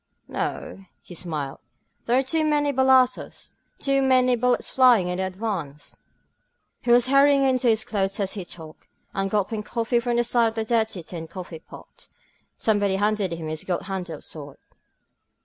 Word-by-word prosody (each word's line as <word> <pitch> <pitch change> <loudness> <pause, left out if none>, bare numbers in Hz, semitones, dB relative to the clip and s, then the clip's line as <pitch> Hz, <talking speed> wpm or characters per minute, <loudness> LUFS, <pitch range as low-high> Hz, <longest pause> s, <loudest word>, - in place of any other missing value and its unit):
^^No," 195 -1 -4 0.2
he - - -12
smiled. 155 -5 -4 0.5
There 240 +2 +3
are 265 - +3
too 315 +4 0
many 295 -2 +1
balassos 260 -1 +2
— - - -44
too 275 0 +3
many 255 -1 +4
bullets 250 +1 +1
flying 245 -8 +4
in 180 +1 -3
the 190 - 0
advance... 185 -8 -5 0.4
." - - -50
He - - -5
was 240 0 +6
hurrying 275 +1 +5
into 255 -1 +1
his 220 -1 +3
clothes 195 -2 -2
as 195 -2 -1
he 195 - -5
talked, 160 -3 -11 0.3
and 195 0 -1
gulping 210 +1 -1
coffee 230 +2 -1
from 240 0 -1
the 240 - +3
side 235 -1 +2
of 225 0 -5
a 220 - -1
dirty 220 -5 0
tin 165 0 -7
coffee 175 -2 -8
pot. - - -14 0.5
Somebody 205 -3 +1
handed 205 -1 0
him 165 -1 -5
his 155 0 -4
gold 180 -2 -2
handled 185 -5 -5
sword. 145 -3 -9
215 Hz, 175 wpm, -24 LUFS, 180-250 Hz, 0.5 s, was